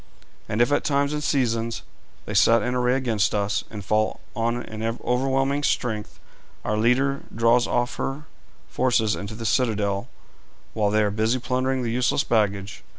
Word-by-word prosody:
And 110 +3 +3
if 120 - -1
at 145 - +2
times 140 0 +1
and 150 0 -2
seasons 115 -5 0 0.4
they - - -5
set 115 +1 +5
in 125 - -1
array 125 0 +2
against 115 -6 0
us, 100 0 0
and 105 -3 -8
fall 110 +1 +1 0.2
on 115 +2 -1
in 110 0 -8
overwhelming 130 +4 0
strength, 110 -7 -2 0.5
our 105 - 0
leader 130 +5 +2
draws 115 +1 +3
off 120 0 -1
her 135 +3 -3 0.4
forces 110 - +1
into 100 +2 -6
the 115 0 -7
citadel 105 -5 0 0.7
while 105 -2 +1
they 105 +1 +2
are 105 - +1
busy 110 +4 +1
plundering 130 +1 -1
the 115 - -1
useless 125 +4 +1
baggage. 100 -3 -1
115 Hz, 160 wpm, -24 LUFS, 110-130 Hz, 0.7 s, set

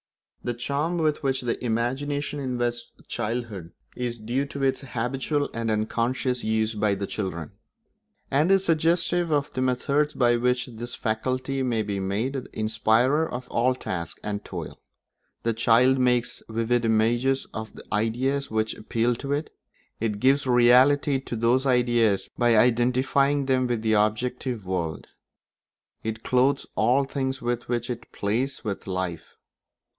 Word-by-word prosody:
The 120 - -2
charm 145 +8 -1
with 155 -2 +1
which 135 -2 0
the 120 -1 -3
imagination 135 +5 -1
invests 120 -3 -2 0.2
childhood 105 -7 -4 0.2
is 120 -1 -3
due 120 +6 -2
to 140 0 -5
its 135 -1 +1
habitual 135 +3 -2
and 115 0 -2
unconscious 120 +4 0
use 110 0 +1
by 105 -1 +1
children, 95 -5 -4 0.8
and 150 +7 +3
is 195 0 +4
suggestive 170 +1 +2
of 145 -1 0
the 130 - -2
methods 140 +4 +1
by 120 -1 +3
which 125 +1 +1
this 120 0 -7
faculty 130 +4 -1
may 120 -4 0
be 100 -1 -3
made 100 +7 -1
the 135 -2 -5
inspirer 115 +8 +2
of 125 +1 -5
all 125 +2 +2
tasks 85 -9 -4
and 105 0 -3
toil. - - -7 0.6
The 115 - +1
child 120 +4 +4
makes 125 -1 +1
vivid 115 +2 0
images 120 +4 +2
of 110 0 -6
the - - -10
ideas 125 +6 0
which 110 0 0
appeal 115 +2 0
to 140 +2 -5
it; 150 +2 -2 0.5
it 105 -2 -1
gives 135 +3 +3
reality 130 +3 +5
to 130 - -6
those 120 +4 +2
ideas 120 -5 +2
by 120 -2 +4
identifying 130 +4 +3
them 130 -1 +2
with 120 -2 -1
the 110 -1 +2
objective 110 +2 0
world; 85 -4 -3 1.0
it 110 0 -4
clothes 130 +2 +2
all 125 +6 +3
things 135 -1 -2
with 120 0 -2
which 120 0 -1
it 120 -1 -7
plays 120 +7 -2
with 100 -4 -4
life. 90 -3 -4
120 Hz, 145 wpm, -25 LUFS, 110-135 Hz, 1.0 s, reality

